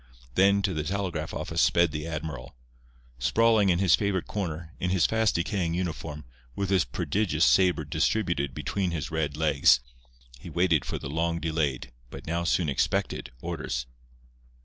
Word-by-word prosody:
Then 100 Hz, +4 st, +4 dB
to 95 Hz, -2 st, 0 dB
the 75 Hz, -, -1 dB
telegraph 85 Hz, -3 st, -3 dB
office -, -, -2 dB
sped 85 Hz, -1 st, +4 dB
the 75 Hz, +1 st, -4 dB
admiral. 80 Hz, -3 st, -6 dB, 0.6 s
Sprawling 110 Hz, -, +3 dB
in 85 Hz, -, +3 dB
his 95 Hz, -1 st, +3 dB
favourite 100 Hz, -4 st, -1 dB
corner, 85 Hz, -4 st, -4 dB
in 90 Hz, -, -1 dB
his 90 Hz, -3 st, +3 dB
fast 110 Hz, -2 st, +2 dB
decaying 85 Hz, -1 st, -1 dB
uniform, 80 Hz, -4 st, -4 dB, 0.3 s
with 100 Hz, -1 st, -2 dB
his 95 Hz, -3 st, +3 dB
prodigious 85 Hz, -, 0 dB
sabre 90 Hz, -5 st, +3 dB
distributed 80 Hz, -3 st, 0 dB
between 95 Hz, -2 st, -2 dB
his 80 Hz, -5 st, -4 dB
red 75 Hz, -3 st, -2 dB
legs, 70 Hz, -5 st, +4 dB, 0.6 s
he -, -, -9 dB
waited 85 Hz, -3 st, +2 dB
for -, -, -3 dB
the -, -, -6 dB
long 85 Hz, +3 st, -1 dB
delayed, 75 Hz, -7 st, -2 dB, 0.2 s
but -, -, -10 dB
now 85 Hz, +2 st, -1 dB
soon 85 Hz, -1 st, +1 dB
expected, 65 Hz, -2 st, -1 dB
orders. 70 Hz, -8 st, -3 dB
85 Hz, 155 wpm, -27 LUFS, 75-95 Hz, 0.6 s, Then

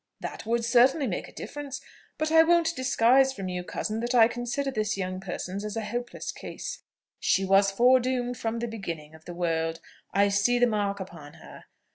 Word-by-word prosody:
"That -, -, -7 dB
would 230 Hz, 0 st, +1 dB
certainly 255 Hz, +5 st, +4 dB
make 200 Hz, -8 st, -3 dB
a -, -, -13 dB
difference; 285 Hz, -1 st, -7 dB, 0.4 s
but 310 Hz, 0 st, -1 dB
I 320 Hz, 0 st, +8 dB
won't 335 Hz, 0 st, +3 dB
disguise 260 Hz, +1 st, +3 dB
from 195 Hz, -6 st, -5 dB
you, 180 Hz, 0 st, -3 dB
cousin, 215 Hz, +4 st, -3 dB
that 240 Hz, +2 st, -1 dB
I 225 Hz, -2 st, +7 dB
consider 240 Hz, +4 st, -3 dB
this 215 Hz, -4 st, -1 dB
young 185 Hz, -1 st, -3 dB
person's 190 Hz, +1 st, -5 dB
as 210 Hz, +1 st, -4 dB
a 220 Hz, -, -2 dB
hopeless 240 Hz, +2 st, -4 dB
case. -, -, -7 dB, 0.4 s
She 195 Hz, -, +2 dB
was 195 Hz, +1 st, +4 dB
foredoomed 245 Hz, +3 st, +2 dB
from 225 Hz, 0 st, -3 dB
the 235 Hz, +1 st, -2 dB
beginning 170 Hz, -9 st, -6 dB
of 160 Hz, 0 st, -16 dB
the 175 Hz, -, -8 dB
world: 165 Hz, -1 st, -1 dB, 0.3 s
I 200 Hz, 0 st, +3 dB
see 205 Hz, +5 st, +2 dB
the 245 Hz, -, +5 dB
mark 205 Hz, -3 st, -1 dB
upon 165 Hz, -6 st, -9 dB
her. 160 Hz, -, -14 dB
225 Hz, 190 wpm, -27 LUFS, 190-250 Hz, 0.4 s, I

